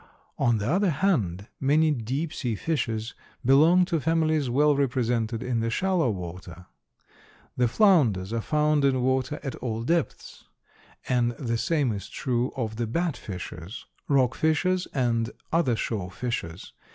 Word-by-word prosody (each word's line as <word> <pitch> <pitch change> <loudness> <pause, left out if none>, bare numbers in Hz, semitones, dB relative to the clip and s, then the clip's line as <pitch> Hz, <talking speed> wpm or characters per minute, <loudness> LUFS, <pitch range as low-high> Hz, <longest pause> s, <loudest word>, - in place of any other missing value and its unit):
On 120 -1 +3
the 105 +1 -3
other 185 +6 +2
hand, 120 - 0
many 155 +3 +3
deep 135 +5 -2
sea 120 -5 -2
fishes 115 -5 -2 0.3
belong 160 +8 +5
to 170 -2 -1
families 155 -2 +1
well 145 +4 +3
represented 120 -4 0
in 125 -2 -1
the 115 0 -1
shallow 180 +2 +1
water. 90 -2 -7 0.9
The 125 - +2
flounders 115 - +3
are 115 - -1
found 150 +2 +1
in 130 -2 +2
water 130 +3 0
at 135 - -4
all 115 -2 -3
depths, 170 +6 -2 0.6
and 120 -1 +1
the 115 0 -3
same 145 -5 +1
is 100 -2 -6
true 125 0 -1
of 110 -4 -3
the 120 -1 -1
bat 165 +5 -1
fishes, 90 0 -8 0.2
rock 130 -3 +3
fishes 180 +5 +1
and 115 -3 0 0.2
other 160 -8 +2
shore 105 -5 -3
fishes. 95 -5 -5
125 Hz, 145 wpm, -26 LUFS, 115-155 Hz, 0.9 s, belong